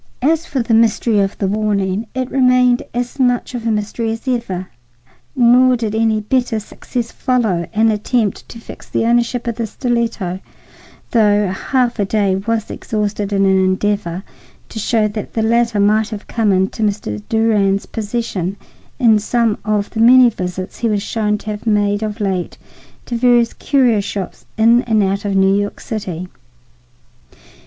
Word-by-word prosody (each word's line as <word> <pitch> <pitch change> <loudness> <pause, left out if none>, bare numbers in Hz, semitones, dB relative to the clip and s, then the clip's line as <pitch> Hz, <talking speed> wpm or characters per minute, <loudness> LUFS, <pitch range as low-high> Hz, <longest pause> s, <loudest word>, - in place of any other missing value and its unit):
As 320 +3 +1
for 265 -4 -1
the 230 - -1
mystery 225 -1 +3
of 195 0 0
the 200 - -1
warning, 205 0 -1
it 260 -1 -3
remained 250 -2 +3
as 245 +3 -4
much 245 -1 +1
of 235 -2 -4
a - - +2
mystery 215 +2 -2
as 225 +4 -7
ever. 195 -8 -2 0.7
Nor 250 0 +5
did 225 -3 -3
any 220 -1 +1
better 245 +1 0
success 230 +3 -5
follow 220 -10 0
an 220 +1 +3
attempt 215 0 -1
to - - -10
fix - - -12
the - - 0
ownership 240 +1 +1
of 235 -2 -3
the 230 -2 -2
stiletto, 230 -7 -2 0.7
though 210 -3 +3
a 190 - -1
half 245 +5 -1
day 200 -2 +1
was 220 +3 -2
exhausted 210 -1 -3
in 195 -1 +2
an 190 -1 +3
endeavor 190 -1 -1 0.5
to 220 - -6
show 220 0 +1
that 210 0 -6
the 220 - +1
latter 230 -1 +2
might 210 +1 +2
have 215 -2 -7
come 220 -3 0
into 190 +3 0
Mr. 200 - -2
Durand's 210 -3 +2
possession 205 -4 -3 0.4
in 220 -3 +4
some 225 0 0
of 210 -1 -1
the 220 - -5
many 245 +1 +7
visits 185 -2 -5
he 230 - 0
was 205 -2 0
shown 210 -1 -1
to 215 +1 -6
have 210 +2 -7
made 205 -1 +1
of 215 0 -4
late 190 -4 -2 0.5
to 240 - -4
various 240 -1 +3
curio 255 -6 +2
shops 200 -1 -5
in 230 +2 +5
and 220 -3 +2
out 195 +1 -1
of 200 -1 -1
New 195 0 +4
York 205 0 -2
City. 185 -5 -5
220 Hz, 165 wpm, -17 LUFS, 200-235 Hz, 0.7 s, many